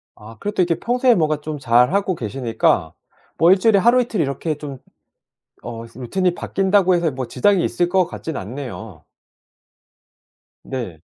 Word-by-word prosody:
아 110 +2 -13
그래도 205 -2 -1
이렇게 170 -2 0
평소에 245 +2 +2
뭐가 155 -3 0
좀 150 -1 -5
잘하고 135 +11 +2
계시니까 115 - 0 0.4
뭐 170 +2 +5
1 190 - +5
주일에 215 -1 +4
하루, 240 +5 +4
이틀 230 -4 -3
이렇게 145 +3 -2
좀 140 -3 -8 0.8
어 115 -1 -7
루틴이 130 +10 -2
바뀐다고 190 0 +2
해서 170 -3 0
뭐 130 -1 -5
지장이 200 - +2
있을 175 - 0
것 185 -1 +2
같진 160 -4 -6
않네요. 110 - -7 1.6
네. 115 -12 -6
155 Hz, 295 characters per minute, -20 LUFS, 125-190 Hz, 1.6 s, 뭐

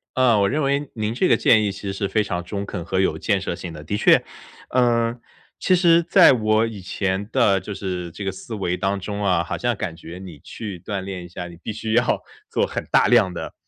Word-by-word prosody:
呃， 125 -4 +4
我 100 0 +3
认 150 +2 0
为 140 +1 0
您 110 0 -2
这 180 +10 +1
个 - - +4
建 110 -2 +4
议 100 - 0
其 100 - -9
实 100 -1 -4
是 100 0 -2
非 105 +2 +1
常 90 -3 -3
中 100 +2 -4
肯 90 -3 -5
和 95 +2 -1
有 80 -5 +1
建 100 +3 0
设 85 -2 -3
性 90 -1 -7
的。 75 - -9
的 90 +7 -3
确 - - +5 0.5
嗯， 120 -1 +2 0.4
其 185 - +3
实 170 -2 +5
在 170 - +6
我 110 -2 +2
以 110 -4 -6
前 95 +2 -2
的 105 -7 +3
就 105 - -7
是 90 -3 -4
这 100 - -7
个 95 - -1
思 110 +4 -8
维 90 -3 -1
当 95 +2 -1
中 100 +2 -4
啊， 90 -3 +2
好 - - -4
像 120 -1 0
感 90 -4 -4
觉 85 +1 -10
你 90 -6 -10
去 100 +3 -8
锻 100 +2 -4
炼 95 -2 -6
一 - - -10
下， 90 0 -7
你 85 -1 -12
必 - - -4
须 110 +1 -4
要 120 +2 +2 0.3
做 - - +1
很 - - -5
大 - - +5
量 110 -7 +4
的 - - -6
100 Hz, 265 characters per minute, -22 LUFS, 90-115 Hz, 0.5 s, 在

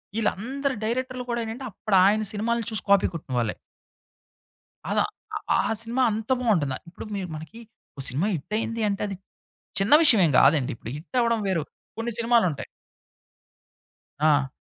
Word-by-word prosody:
వీళ్ళందరు 255 +6 -1
డైరెక్టర్లు 255 +2 -2
కూడా 235 0 -1
ఏంటంటే, 225 +4 -6
అప్పుడు 205 +1 -1
ఆయన 215 +2 +3
సినిమాలు 230 +3 -1
చూసి 215 - -1
కాపీ 200 -1 +5
కొట్టిన 150 -5 -8
వాళ్ళే. 115 -3 -1 1.4
అలా - - +2 0.5
ఆ - - +1
సినిమా 240 +3 -1
అంత 220 +2 -4
బాగుంటుందా, 160 - +1
ఇప్పుడు 170 - -9
మీరు 190 -3 -4
మనకి 160 +9 -10 0.4
ఓ - - -4
సినిమా 145 +11 -1
హిట్ 155 +6 -7
అయింది 225 0 -3
అంటే, 200 -1 -2
అది 195 - -5 0.6
చిన్న 200 +8 +3
విషయం 230 -10 +7
ఏమి 145 -5 +1
కాదండి! 145 -2 +4
ఇప్పుడు 115 - -8
హిట్ 180 +11 -6
అవ్వడం 230 -1 +2
వేరు 175 -5 0 0.3
కొన్ని 230 +1 -2
సినిమాలుంటాయి 230 - +2 1.5
ఆ! 150 -3 +3
210 Hz, 150 wpm, -25 LUFS, 160-235 Hz, 1.5 s, విషయం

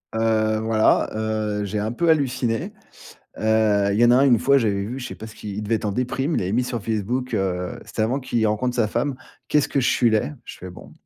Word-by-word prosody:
Heu, 110 -1 +1
voilà, 110 0 +2
heu, 110 -1 -2
j'ai 105 +2 -3
un 105 +2 -2
peu 170 +8 0
halluciné. 130 -7 0 0.7
Heu, 110 -2 +2
il 100 - 0
y - - +6
en 120 - +5
a 120 - +6
un, 135 - +5
une 120 -4 +5
fois, 140 +5 +4
j'avais 100 -5 0
vu, 120 +6 -5
je 125 - -5
sais - - -7
pas 110 - -9
ce 110 - -12
qu'il 105 - -8
il 105 - -3
devait 110 +2 0
être - - -7
en 105 - -1
déprime, 135 +7 -1
il - - 0
avait 90 +2 -2
mis 125 +3 +1
sur 120 -3 -4
Facebook, 115 +4 -2
heu 90 -3 -2
c'était - - -3
avant 125 +6 0
qu'il 120 -3 0
rencontre 120 +4 -1
sa 115 -3 +2
femme: 130 +5 -1 0.3
«Qu'est-ce 150 -2 +2
que 140 - 0
je 125 - +1
suis 120 -2 +3
laid». 110 +6 0
Je - - -10
fais: 95 - -8
«Bon». 90 - -13
110 Hz, 255 wpm, -22 LUFS, 105-125 Hz, 0.7 s, y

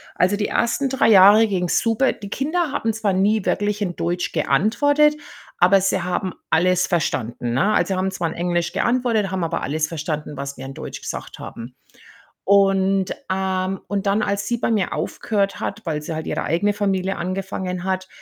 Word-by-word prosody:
Also, 185 +3 +2
die 210 - -1
1. 255 +4 0
3 255 -4 +2
Jahre 205 +2 +7
ging's 180 -4 +1
super. 230 +3 +1
Die 200 - -10
Kinder 310 - -1
haben 225 -5 -1
zwar 215 -2 0
nie 200 +2 +2
wirklich 210 0 0
in 180 -4 -2
Deutsch 175 +1 -2
geantwortet, 290 +8 +3 0.4
aber 190 +2 +5
sie 190 0 +1
haben 180 +1 -2 0.2
alles 180 +2 +3
verstanden, 120 - -1
ne? 195 - +2
Also, 195 - +1
haben 185 +1 0
zwar 175 -3 -2
in - - -7
Englisch 175 -1 -1
geantwortet, 235 -5 +1
haben 190 -2 -2
aber 165 - -2
alles 155 +2 -1
verstanden, 155 -2 -4
was 140 0 -5
wir 130 - -8
in 135 - -7
Deutsch - - -7
gesagt - - -7
haben. 120 +2 -9 0.7
Und, 195 -1 +3 0.2
ähm 190 0 -1
und 200 -1 -2
dann, 200 +2 +2
als 200 0 -1
sie 240 - 0
bei 235 - -1
mir 210 -4 0
aufgehört 200 -3 -2
hat, 200 +3 -4
weil 155 -3 -2
sie 155 +2 -5
halt 160 0 -5
ihre - - -2
eigene 205 +6 +1
Familie 195 -2 -1
angefangen 185 0 -4
hat, 185 0 -2
190 Hz, 185 wpm, -21 LUFS, 175-210 Hz, 0.7 s, Jahre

